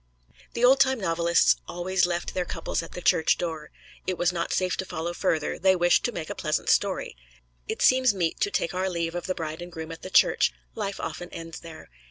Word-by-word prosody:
The 235 - +2
old 265 +2 +6
time 265 -2 +3
novelists 170 -2 +3
always 180 +1 0
left 175 0 -3
their 180 - 0
couples 175 - -3
at 165 - -10
the 180 - -7
church 160 - +3
door. 160 -3 -4 0.4
It 185 -1 -1
was 175 0 +1
not 170 -1 -2
safe 185 -1 +1
to - - -1
follow 170 -1 -4
further 165 -4 -1
they 190 +1 +4
wished 175 0 +3
to 245 - 0
make 165 -7 -5
a - - -2
pleasant 155 -1 -2
story. - - +1 0.5
It - - -2
seems 255 -1 +5
meet 175 -5 -2
to 405 - +1
take 185 - -1
our 185 +1 -1
leave 170 -2 -2
of 175 +1 -4
the 185 - -1
bride 160 0 -5
and 175 0 -8
groom 160 -1 -7
at 165 - -9
the 185 - -7
church: - - +4 0.2
life 200 -3 -4
often 175 - -5
ends 165 0 -8
there. 160 - -12
175 Hz, 225 wpm, -26 LUFS, 165-190 Hz, 0.5 s, old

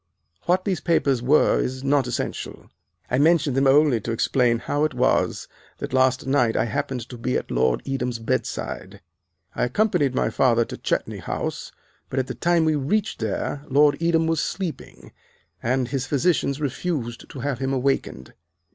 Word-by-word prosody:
What 185 +1 +2
these 190 -4 0
papers 140 -7 +1
were 135 +5 +4
is 130 +1 -3
not 140 -2 +2
essential; 125 - -5 0.4
I 125 - +2
mention 155 -2 +3
them 135 +1 +2
only 135 -4 +4
to 115 - -4
explain 120 +1 +2
how 145 +5 -1
it 155 -4 0
was 125 +1 +1 0.3
that - - -6
last 130 0 +2
night 130 -4 +2
I - - +2
happened 120 +2 -3
to 125 - -9
be 65 - 0
at 65 - -6
Lord 60 0 +1
Edam's 125 -3 -2
bed 115 -1 -1
side. 95 +1 -6 0.5
I - - 0
accompanied 140 - +1
my - - +1
father 120 -3 +3
to - - -7
Chetney - - -2
House, - - -4 0.4
but 130 - -5
at 130 - +1
the - - -5
time 170 -1 +2
we 155 - +3
reached 195 +10 -1
there 110 +6 -3
Lord 145 +2 +4
Edam 165 -1 +2
was 160 -2 +1
sleeping, 160 - -5 0.5
and 125 +1 0
his 135 -2 -2
physicians 145 -1 +1
refused 140 -4 -3
to 135 - -9
have 135 -2 -2
him 135 0 -1
awakened. 130 - -1
135 Hz, 175 wpm, -23 LUFS, 120-150 Hz, 0.5 s, were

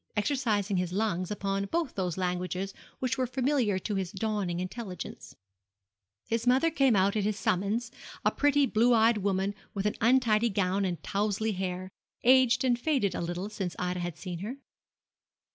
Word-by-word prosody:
exercising 210 -5 +1
his 180 -1 -1
lungs 185 -3 -1
upon 195 -1 -1
both 330 +7 -1
those 180 -3 -2
languages 180 +1 -2 0.2
which 255 0 -1
were 255 - +1
familiar 255 -5 +1
to 205 +3 -3
his 190 -3 -2
dawning 195 -4 -2
intelligence. 185 0 -6 0.9
His 230 +1 -2
mother 265 +7 +4
came 270 -7 +3
out 195 +1 +3
at 210 - +1
his 210 0 0
summons, 215 +4 0 0.3
a - - +5
pretty, 290 -1 +3
blue 235 0 +3
eyed 225 0 +4
woman 195 0 0 0.2
with 200 0 -2
an 210 - +2
untidy 235 -2 +4
gown 195 -1 +1
and 175 -4 -2
towzley 210 +2 0
hair, 185 0 -4 0.3
aged 255 0 +5
and 245 -2 +2
faded 260 -8 +1
a - - -3
little 175 +3 -3
since 195 -4 -4
Ida 180 0 -2
had 175 -2 -4
seen 180 -3 -6
her. 225 +8 -5
205 Hz, 165 wpm, -29 LUFS, 185-240 Hz, 0.9 s, a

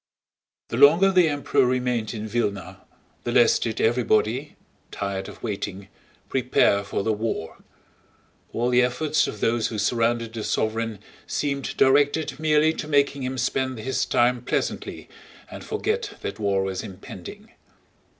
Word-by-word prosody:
The 115 - -3
longer 165 +8 +6
the 180 -4 +4
Emperor 145 -1 +1
remained 125 -3 0
in 110 0 -5
Vílna 105 -4 -2 0.5
the 120 - -2
less 120 -1 +5
did 115 -2 -3
everybody—tired 110 -4 -1
of - - -13
waiting—prepare 100 +2 -1
for 100 - -3
the 110 - +1
war. 105 -7 -4 0.9
All 120 +2 0
the 125 0 +5
efforts 145 +5 +1
of 105 - -7
those 115 0 +1
who 110 - -5
surrounded 115 +2 0
the 110 -2 -4
sovereign 110 0 -1 0.3
seemed 140 -2 -2
directed 145 +4 +3
merely 155 0 +3
to 150 - -6
making 140 -1 +2
him 130 0 -3
spend 130 +1 -1
his 130 +4 -1
time 125 0 +2
pleasantly 125 - -3 0.4
and - - -8
forget 435 -1 -2
that - - -5
war 100 -2 +1
was 95 -1 -3
impending. 95 -2 -10
120 Hz, 135 wpm, -24 LUFS, 110-140 Hz, 0.9 s, longer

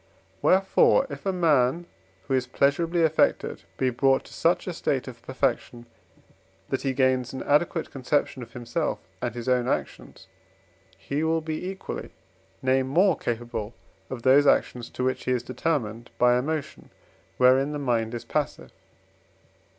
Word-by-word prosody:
Wherefore, 195 +7 +4
if - - -6
a - - +3
man 165 -3 +2 0.4
who 135 - -3
is 130 -1 +1
pleasurably 165 +6 +1
affected 160 -1 +1 0.2
be 130 -1 +1
brought 135 +2 +2
to - - -15
such 170 +2 +1
a 180 - -3
state 135 -5 -1
of 120 -2 -9
perfection, 125 -2 -2 0.8
that - - -1
he 135 - 0
gains 130 -1 +1
an 130 - -5
adequate 160 +3 +1
conception 135 0 -1
of 115 -1 -10
himself 125 +7 -2 0.2
and 120 -2 -3
his 120 0 -6
own 125 -1 +2
actions, 60 - -4 0.7
he 145 +3 -3
will 160 0 +1
be 160 +3 -4
equally, 190 0 -6 0.5
nay 130 0 +3
more, 170 +8 +3
capable 120 -3 -4 0.3
of 125 -3 -6
those 140 +2 +5
actions, 125 -3 +1
to 125 - -4
which 130 0 -1
he 130 - +1
is 125 -1 -1
determined 120 -3 -2
by 125 0 +4
emotion 145 +4 -3 0.5
wherein 130 +3 +4
the 150 - -3
mind 120 -4 -1
is 115 - -6
passive. - - -3
130 Hz, 150 wpm, -26 LUFS, 125-155 Hz, 0.8 s, those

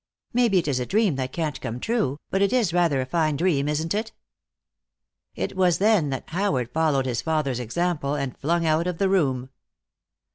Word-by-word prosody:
Maybe 235 -5 +3
it 170 - +1
is 135 -3 0
a 125 - -2
dream 205 -5 +2
that 130 -1 -3
can't 155 -3 -3
come 115 +2 -4
true, 150 - -1
but 195 - +1
it 200 - +3
is 235 -9 +1
rather 170 -7 +2
a - - -2
fine 155 +2 0
dream, 145 -3 +1
isn't 160 +2 -1
it?" 220 +2 -3 1.2
It - - -3
was 180 -2 +3
then 200 -7 +3
that 130 -1 -4
Howard 145 - 0
followed 155 -4 +2
his 120 -2 -1
father's 150 -4 -1
example, 145 +3 -1
and 140 -3 -3
flung 165 +3 0
out 160 +2 +2
of 180 -2 -2
the 195 +1 +1
room. 135 -9 +1
160 Hz, 190 wpm, -24 LUFS, 135-185 Hz, 1.2 s, Maybe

